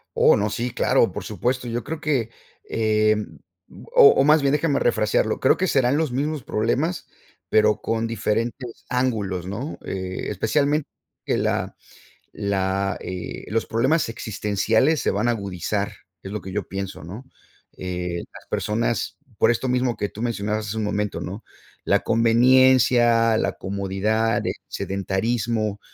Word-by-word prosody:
Oh - - +5
no, 105 0 0
sí, 120 +4 -3
claro, - - +2
por - - -6
supuesto, 125 +5 -2
yo 120 0 -3
creo 160 +6 -5
que, 135 -8 0 0.4
eh, 110 -1 +2 0.8
o - - +9
o - - +4
más 150 +2 +5
bien 140 0 +2
déjame 150 -1 +1
refrasearlo, 110 0 +1
creo - - +4
que 185 - 0
serán 135 -3 +2
los 155 -4 0
mismos 145 +2 -2
problemas 130 +13 -1 0.4
pero 105 0 +3
con 115 0 -1
diferentes 115 +2 -3
ángulos 110 -8 -1
¿no? 115 +10 -5
Eh, 95 -1 -4
especialmente 140 - +1 0.4
que - - +1
la - - -1 0.6
la 100 0 -1
eh, 90 -1 -6
los 115 +1 0
problemas 135 +8 +1
existenciales 110 +6 +1
se - - +1
van 105 +4 0
a - - +4
agudizar, 100 -1 -2 0.3
es 95 - -7
lo 105 - -4
que 95 - -8
yo 100 0 -3
pienso 95 -2 -5
¿no? 95 +10 -8 0.5
Eh, 90 -1 -4
las - - -13
personas, 115 +2 -1 0.2
por - - +4
esto 120 +2 -1
mismo 125 -1 +1
que 105 -1 -3
tú 110 - -9
mencionabas 110 -2 -2
hace 105 +2 -4
un 110 - -1
momento 105 0 -2
¿no? 100 +5 -6 0.4
La - - +3
conveniencia, 120 -1 +4
la - - 0
comodidad, 100 +4 -1
el - - 0
sedentarismo, 110 +2 -2
110 Hz, 150 wpm, -23 LUFS, 100-125 Hz, 0.8 s, o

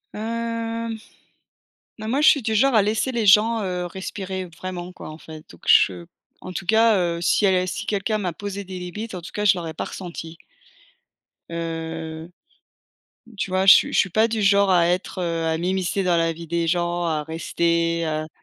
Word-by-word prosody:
Hem, 230 0 -3 1.0
ben 215 - -5
moi, 265 +5 +1
je 300 - +6
suis 285 - +4
du 220 0 0
genre 270 +4 +3
à 215 - +6
laisser 215 +5 0
les 230 -3 -1
gens, 220 +3 +5
heu, 180 -2 -3
respirer 190 +1 -5
vraiment 175 +1 -7
quoi - - -10
en 155 0 -9
fait. 155 -1 -12
Donc 85 - -16
je 90 -2 +4 0.3
en 185 - -8
tout 180 +1 -6
cas, 220 +1 +4
heu, 170 -2 -1
si 175 - +2
elle 185 -1 +2
si - - -4
quelqu'un 215 +1 -1
m'a 185 -4 -2
posé 200 +2 -6
des 185 -1 -7
limites, 210 +5 -6
en 180 - -6
tout 170 - -9
cas, 210 - -2
je 195 -2 +5
l'aurais 165 -2 -5
pas - - -4
ressenti. 170 -3 -8 1.1
Heu, 165 -1 -5 1.1
tu 195 - -3
vois 185 +1 +1
je 195 - +11
suis - - +2
je - - +1
suis 195 - +3
pas 220 +5 +3
du 225 -1 -2
genre 200 0 +4
à 175 -2 +4
être, 180 +2 -2
heu, 165 -2 -1
à 160 0 0
m'immiscer 185 +2 -1
dans 180 -2 +2
la 165 0 +1
vie 165 +1 -10
des 170 +1 -1
gens, 175 +1 0
à 155 -3 -1
rester, 170 +1 0
heu 155 0 -3
185 Hz, 200 wpm, -23 LUFS, 170-210 Hz, 1.1 s, je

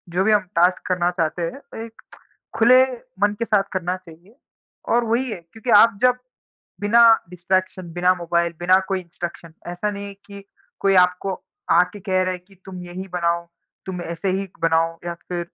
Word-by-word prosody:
जो 185 - +3
भी 215 - +3
हम 210 -1 +4 0.2
टास्क 180 +2 +3
करना 180 -1 +1
चाहते 175 -1 -2
हैं, 170 +12 -4 0.2
एक 225 0 -15 0.6
खुले 250 +3 +7 0.4
मन 205 0 +3
के 230 - 0
साथ 210 -3 +3
करना 180 -1 -1
चाहिए। 180 +4 -17 0.5
और 240 +1 +3
वही 240 +3 0
है, 200 - -5
क्योंकि 225 +2 -7
आप 230 -2 +5
जब 250 0 +5 0.6
बिना 215 +3 +4 0.3
डिस्ट्रैक्शन, 185 0 -2
बिना 180 +1 +3
मोबाइल, 170 -1 0
बिना 185 +2 +4
कोई 195 -1 -1
इंस्ट्रक्शन, 170 -1 -8
ऐसा 175 +4 -2
नहीं 200 0 -6
है 200 - -9
कि 200 -1 -11 0.4
कोई 195 -1 +3
आपको 180 +2 -5 0.4
आके 180 +3 +3
कह 185 -1 0
रहा 185 - -1
है 185 - -4
कि 190 +2 -23
तुम 185 -2 -8
यही 180 +2 -7
बनाओ, 170 0 0 0.4
तुम 180 -2 -5
ऐसे 170 +4 -3
ही 195 - -4
बनाओ, 165 0 +2
या 175 - -2
फिर 175 -1 -3
185 Hz, 180 wpm, -22 LUFS, 175-200 Hz, 0.6 s, खुले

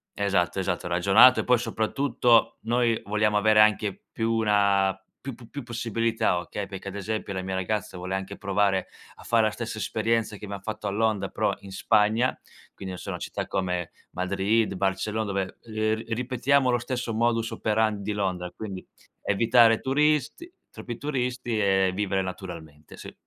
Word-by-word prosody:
esatto, 100 -2 0
esatto, 90 -2 -2
ragionato 100 +9 +6
e - - 0
poi 125 -1 +4
soprattutto, 115 0 +1
noi 120 0 +1
vogliamo 105 0 +1
avere 105 0 +5
anche 105 -2 +2
più 115 0 -1
una 100 -3 +2 0.3
più 135 -3 -5
pu 120 -2 -15
più 140 -3 -6
possibilità, 115 -4 0
okay, 100 +3 -5
perché, 100 0 -7
ad 100 - -9
esempio, 105 +1 -3
la 95 - -3
mia 95 0 -4
ragazza 95 +1 -2
vuole 90 +1 -5
anche 95 +1 -4
provare 100 -1 +1 0.3
a - - -15
fare 115 -2 +3
la 110 - -1
stessa 115 -1 -5
esperienza, 110 0 -1
che 105 - -14
abbiam 100 -1 -6
fatto 105 +1 -6
a - - 0
Londra, 110 0 0
però - - 0
in 100 - -11
Spagna, 110 +5 +2 0.4
quindi, 95 -1 -7
non - - -6
so, - - -5
città - - -4
come 90 -2 -2 0.2
Madrid, 100 +4 0
Barcellona, 100 +3 -1
dove, 95 -2 -3
uhm, 115 - -13
ri 110 +1 0
ripetiamo 130 +2 +1
lo 120 - +3
stesso 120 -2 -3
modus 115 0 +1
operandi 110 -1 0
di 105 - -2
Londra, 90 -3 -2
quindi 100 -4 -7 0.4
evitare 115 +2 +4
turisti 150 - 0 0.2
troppi 120 -2 -7
turisti 125 -5 -2
e 95 -2 +3
vivere 95 -1 0
naturalmente, 85 -5 -8
sì. - - -10
105 Hz, 170 wpm, -26 LUFS, 95-115 Hz, 0.4 s, ragionato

